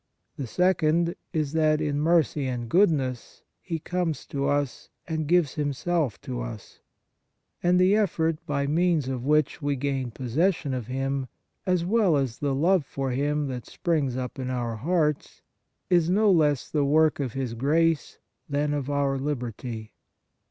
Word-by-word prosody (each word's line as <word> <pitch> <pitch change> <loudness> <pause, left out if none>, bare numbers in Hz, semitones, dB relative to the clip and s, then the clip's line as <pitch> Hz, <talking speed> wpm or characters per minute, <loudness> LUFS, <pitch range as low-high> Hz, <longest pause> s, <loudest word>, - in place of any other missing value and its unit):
The 135 - -5
second 170 +1 +2 0.2
is 155 -5 -1
that, 155 -1 +3
in 145 -2 -1
mercy 155 -3 +2
and 120 -2 -3
good 190 - +5
ness, 130 -6 -3 0.2
He 165 -3 -3
comes 170 -2 -2
to 140 0 -2
us 145 -2 -1 0.2
and 160 -2 -2
gives 170 -4 +3
Him 145 -2 -1
self 155 - -1
to - - -5
us; - - -8 0.8
and 180 +1 +3
the 185 +2 +5
effort 165 -6 0
by 140 -1 0
means 160 -1 +1
of 130 -2 -3
which 150 +1 +2
we 145 -1 0
gain 135 -2 -2
possession 140 - 0
of 125 -4 -4
Him, 135 +1 -2 0.4
as 180 -2 +2
well 195 -5 +3
as 130 -4 -2
the 140 -2 0
love 170 +4 +3
for 135 -1 -3
Him 145 +3 0
that 125 -3 -6
springs 145 -7 -1
up 130 +1 -5
in 130 -1 -3
our 120 -3 -2
hearts, 150 +2 -1 0.4
is 175 -2 +3
no 205 +2 +4
less 150 -7 +2
the 150 -2 0
work 155 +2 +3
of 130 -5 -2
His 130 -3 -3
grace 155 +6 +1 0.3
than 145 +1 0
of 145 -2 -2
our 140 -1 0
liberty. 120 -5 -4
145 Hz, 165 wpm, -26 LUFS, 130-165 Hz, 0.8 s, good